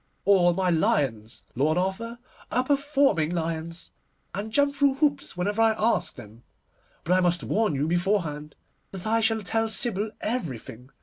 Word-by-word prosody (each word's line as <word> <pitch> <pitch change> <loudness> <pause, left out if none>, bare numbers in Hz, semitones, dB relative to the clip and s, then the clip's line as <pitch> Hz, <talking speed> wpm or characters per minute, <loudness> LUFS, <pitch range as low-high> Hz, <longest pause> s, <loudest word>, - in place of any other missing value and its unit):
All 180 -3 +4
my 185 -1 +1
lions, 130 -9 0
Lord 150 +6 +1
Arthur, 190 +6 -2 0.3
are 250 - +2
performing 280 - +2
lions, 165 0 -4 0.4
and 205 +4 -4
jump 285 +3 +2
through 280 -1 +2
hoops 280 - 0
whenever 205 +5 0
I 225 -1 +5
ask 225 +2 0
them. 110 +2 -13 0.6
But 175 - +1
I 185 - +4
must 175 -1 +1
warn 215 -8 0
you 140 +2 0
beforehand 170 -4 -1 0.4
that 190 -2 -7
I 225 +1 +2
shall 220 -1 +1
tell 225 +4 0
Sybil 220 -2 -1
everything. 130 - -5
190 Hz, 150 wpm, -26 LUFS, 160-225 Hz, 0.6 s, I